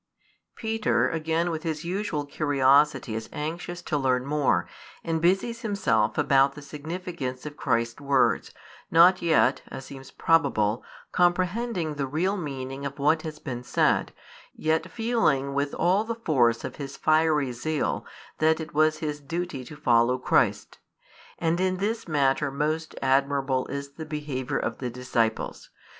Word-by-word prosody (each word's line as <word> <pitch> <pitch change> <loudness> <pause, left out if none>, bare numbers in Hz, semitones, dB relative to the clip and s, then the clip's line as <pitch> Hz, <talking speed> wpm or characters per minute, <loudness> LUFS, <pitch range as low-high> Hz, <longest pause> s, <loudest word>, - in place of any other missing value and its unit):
Peter 225 -1 +1
again 165 +2 0
with 160 -1 -3
his 160 -1 -4
usual 180 -5 -2
curiosity 140 -3 +2
is 110 0 -5
anxious 170 +3 -5
to 150 - -1
learn 130 -1 +1
more, 145 0 +1 0.4
and 165 -1 -1
busies 195 +7 +1
himself 120 - +1
about 135 -2 +3
the 150 - -9
significance 150 -3 -6
of 150 -1 -6
Christ's 115 +1 -1
words, 140 -2 +2 0.4
not 175 +3 +6
yet 160 -5 +3
(as 135 - -8
seems 135 -1 -10
probable) 110 -9 +2 0.3
comprehending 180 0 +1
the 140 -2 -3
real 175 +8 0
meaning 135 -5 -5
of 140 0 -5
what 155 +3 +2
had 155 -2 -8
been 125 -3 -5
said, - - +1 0.4
yet 160 0 0
feeling 225 - +1
with 140 +1 0
all 190 +4 +2
the 230 +1 -3
force 125 - +2
of - - -6
his 140 -1 -7
fiery 155 -4 +2
zeal 150 +6 -2 0.4
that 160 +1 +3
it 160 - -7
was 155 +1 +3
his 150 -1 -3
duty 160 -1 -4
to 150 - -10
follow 125 -3 +3
Christ. 130 - +1 0.6
And 165 +1 0
in 185 0 +1
this 220 +3 -2
matter 145 -2 +2
most 155 +3 -2
admirable 135 -1 +1
is 140 0 -5
the 160 +3 -8
behaviour 145 -3 -3
of - - -3
the 125 - -3
disciples. 115 -2 -2
150 Hz, 150 wpm, -26 LUFS, 135-170 Hz, 0.6 s, not